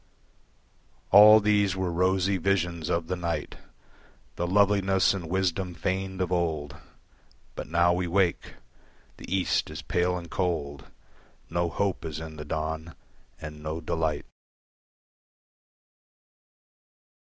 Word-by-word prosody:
All 105 +2 +9
these 105 -2 +2
were 95 -2 -2
rosy 95 +2 +1
visions 85 -3 -1
of 85 -1 0
the 90 +2 -2
night, 85 -2 -4 0.8
The 85 - -2
loveliness 95 0 +3
and 90 -5 -6
wisdom 95 -1 -1
feigned 95 +1 -3
of 90 -1 -1
old. 80 -5 -1 0.8
But - - -7
now 85 +2 +3
we 90 0 -1
wake. 90 0 0 0.6
The - - -11
East 95 -1 +1
is - - -7
pale 90 +1 0
and 85 -1 -8
cold, 75 -6 -3 0.7
No 85 0 0
hope 95 +3 -2
is 80 -1 -5
in 80 -1 -8
the 75 - -7
dawn, 80 +1 -4 0.4
and 75 -1 -9
no 80 +1 -4
delight. 80 -2 -2
85 Hz, 120 wpm, -27 LUFS, 80-95 Hz, 0.8 s, All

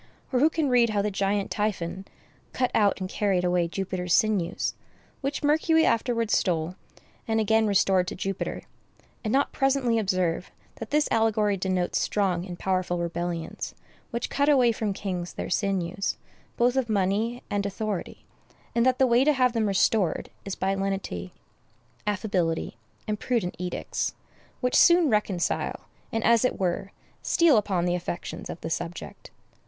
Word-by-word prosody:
Or 250 - +3
who 300 +4 +5
can 320 -2 0
read 245 -2 +4
how 205 -2 0
the 210 - 0
giant 200 +1 0
Typhon 190 -3 -2 0.5
cut 250 -1 0
out 205 -3 +3
and 185 - -3
carried 190 -2 0
away 175 -1 +2
Jupiter's 180 -1 -1
sinews—which 215 - -2
Mercury 320 +2 +3
afterwards 230 -1 +1
stole, 170 -1 0 0.5
and 225 -1 +1
again 220 0 +3
restored 190 -2 +3
to - - -4
Jupiter—and 195 +3 -6
not 275 +3 +2
presently 265 -4 +2
observe 185 -4 0 0.3
that 225 - -7
this 300 0 +2
allegory 215 -2 +2
denotes 185 -1 0
strong 190 -3 0
and 175 -1 -7
powerful 185 -1 0
rebellions, 170 -1 -4 0.3
which 235 0 -3
cut 285 +1 +2
away 255 -5 +5
from 215 -2 -2
kings 185 -3 -4
their - - -5
sinews, 195 -1 -1 0.4
both 245 +1 +3
of 260 -3 0
money 215 +4 0
and 200 -1 0
authority; 205 -1 -4 0.5
and 235 0 +2
that 255 -1 +3
the 265 - +4
way 245 +1 +4
to 300 +2 +4
have 255 -3 +2
them 225 -3 +1
restored 195 -2 +1
is 195 - -4
by 195 +1 0
lenity, 195 - -3 0.8
affability, 185 -5 -1 0.3
and 210 -1 -2
prudent 225 -8 -1
edicts, 180 0 -3 0.5
which 250 -1 0
soon 340 -5 +6
reconcile, 205 -4 0 0.3
and, 225 0 -1
as 235 -1 +4
it 250 - 0
were, 190 +1 -1 0.3
steal 335 -5 +4
upon 195 -5 +1
the 175 - +1
affections 175 -1 -5
of - - -6
the 160 - -4
subject? 170 +1 -5
205 Hz, 150 wpm, -26 LUFS, 180-235 Hz, 0.8 s, soon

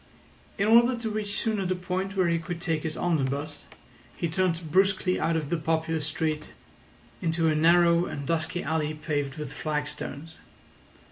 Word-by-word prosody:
In 200 - +1
order 235 +3 +6
to 225 -2 -3
reach 210 -1 -1
sooner 215 -3 0
the 185 0 0
point 185 +2 -3
where 185 -2 +3
he 170 0 +1
could 170 +1 -5
take 165 -3 -1
his 160 0 -4
omnibus, 145 -3 -1 0.5
he 170 - -1
turned 165 -1 -1
brusquely 190 0 +3
out 165 - +1
of 150 -3 -4
the 170 - +2
populous 160 -1 -1
street 155 0 -2 0.7
into 165 0 +1
a - - +3
narrow 170 +2 +5
and 140 -1 -5
dusky 165 +3 -1
alley 155 0 -1
paved 145 -2 -2
with 150 -2 -6
flagstones. 150 +1 -4
165 Hz, 160 wpm, -27 LUFS, 155-180 Hz, 0.7 s, order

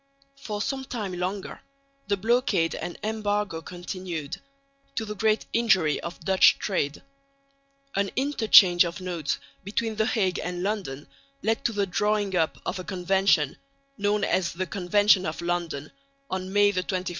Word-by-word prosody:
For 215 -6 -4
some 270 -1 -2
time 215 -8 -4
longer 185 +2 -4 0.5
the 200 0 +1
blockade 225 -5 +2
and 175 - -5
embargo 210 -5 -1
continued, 175 -3 -6 0.5
to 225 - -1
the 210 - -5
great 215 +1 +1
injury 190 -10 +3
of 170 +1 -7
Dutch 190 +3 +5
trade. 150 -8 -2 0.9
An 200 0 +1
interchange 220 -10 +6
of 170 +1 -4
notes 175 -6 -2 0.3
between 215 +3 -2
the 220 0 +2
Hague 190 -5 +1
and 180 0 -3
London 190 -9 -3 0.4
led 225 +1 0
to - - +3
the 205 -2 0
drawing 205 +1 0
up 160 -3 +1
of 190 - -3
a - - -5
convention, 185 -5 +1 0.4
known 205 -1 0
as 185 -2 +1
the 185 +2 -2
Convention 195 +2 +3
of 155 - -4
London, 170 -4 -3 0.4
on 185 0 -3
May 205 0 +4
21, 200 - -7
1833. 185 0 -1
190 Hz, 150 wpm, -26 LUFS, 175-210 Hz, 0.9 s, interchange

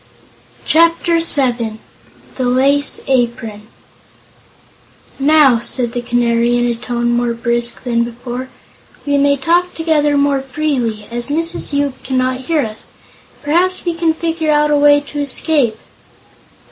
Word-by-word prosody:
Chapter 335 +1 +3
Seven 245 -8 +2 0.6
The 260 - -2
Lace 275 +3 +2
Apron 235 -4 -2 1.5
"Now," 280 -4 +4
said 240 0 -2
the 245 - -3
Canary, 240 0 +1
in 240 - +1
a 240 - 0
tone 240 0 -2
more 240 0 0
brisk 235 0 0
than 235 -2 0
before, 245 +2 -7 0.6
"we 285 -1 +1
may 280 0 +2
talk 345 +5 0
together 300 -3 +1
more 280 -1 +1
freely, 255 -6 -2
as 240 0 -4
Mrs. 330 +4 -1
Yoop 285 -2 -1
cannot 255 0 -2
hear 325 -3 +1
us. 220 -4 -6 0.5
Perhaps 355 +6 0
we 345 - 0
can 330 -1 0
figure 325 -1 -1
out 300 0 +2
a - - +3
way 290 0 +5
to 290 0 -7
escape." 285 -4 +1
270 Hz, 135 wpm, -16 LUFS, 240-300 Hz, 1.5 s, way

